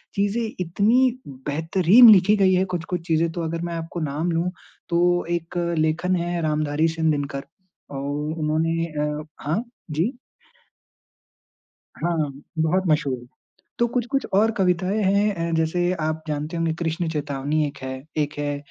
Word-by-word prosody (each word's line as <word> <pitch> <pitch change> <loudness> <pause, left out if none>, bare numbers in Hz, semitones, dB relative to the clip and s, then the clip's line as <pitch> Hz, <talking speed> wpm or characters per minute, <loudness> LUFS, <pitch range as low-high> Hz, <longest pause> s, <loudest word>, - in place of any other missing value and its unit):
चीज़ें 205 +4 +1 0.2
इतनी 230 +9 +2
बेहतरीन 165 - +5
लिखी 205 +1 +7
गयी 190 -1 +4
है। 185 +1 +2
कुछ-कुछ 170 +1 -3
चीज़ें 165 0 +2
तो 170 - -4
अगर 165 +1 -3
मैं 170 0 -3
आपको 165 +1 -5
नाम 155 +3 -1
लूँ, 170 +2 0 0.4
तो 175 0 +2
एक 170 0 -3 0.2
लेखन 160 +4 +1
है 175 0 -1
रामधारी 155 0 +1
सिंह 160 -1 +1
दिनकर, 140 -1 -3 0.5
अ, - - -6
उन्होंने 155 +3 -1
अ 150 -1 -3 0.2
हाँ। 170 +11 0 0.3
जी। 175 - 0 1.9
हाँ, 170 -1 +1 0.4
बहुत 175 +4 +2
मशहूर 150 -4 +1
है। 120 - -14 0.5
तो 240 - +3
कुछ-कुछ 250 +3 -1
और 220 +3 +4
कविताएँ 185 +3 +1
हैं 200 +1 +2
ऐं, 165 0 -2
जैसे 175 +2 +1
आप 155 0 -2
जानते 150 +3 -3
होंगे, 165 -1 0
"कृष्ण 165 0 -1
चेतावनी" 145 0 -1
एक 140 - -9
है, 130 0 -4 0.2
एक 150 0 0
है 145 -1 -1
165 Hz, 150 wpm, -23 LUFS, 155-180 Hz, 1.9 s, लिखी